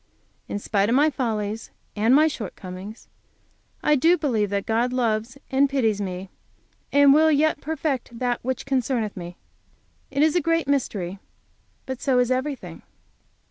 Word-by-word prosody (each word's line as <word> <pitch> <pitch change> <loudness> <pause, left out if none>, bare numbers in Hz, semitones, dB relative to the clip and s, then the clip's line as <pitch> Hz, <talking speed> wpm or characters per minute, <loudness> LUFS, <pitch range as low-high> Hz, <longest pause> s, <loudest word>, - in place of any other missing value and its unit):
In - - -3
spite 205 0 0
of 235 - +3
my 300 +3 +4
follies 220 -4 -3 0.3
and 225 +5 +4
my 305 +2 +6
shortcomings, 200 - -7 0.8
I 300 - +4
do 330 +6 +4
believe 230 - 0
that 200 0 -2
God 235 +3 +1
loves 235 0 -1
and 275 +1 +3
pities 225 -7 +1
me, 185 -1 -5 0.6
and 285 -1 +6
will 315 +2 +5
yet 305 0 +2
perfect 280 -6 -3
that 245 0 -1
which 260 0 -3
concerneth 255 -5 -1
me. 175 -1 -8 0.7
It 280 +1 +1
is 315 +1 +3
a 350 - +3
great 330 -1 +1
mystery. 200 -9 -1 0.7
But 260 -1 -5
so 265 -3 +2
is 250 0 +2
everything. 260 +2 -3
250 Hz, 150 wpm, -24 LUFS, 215-280 Hz, 0.8 s, my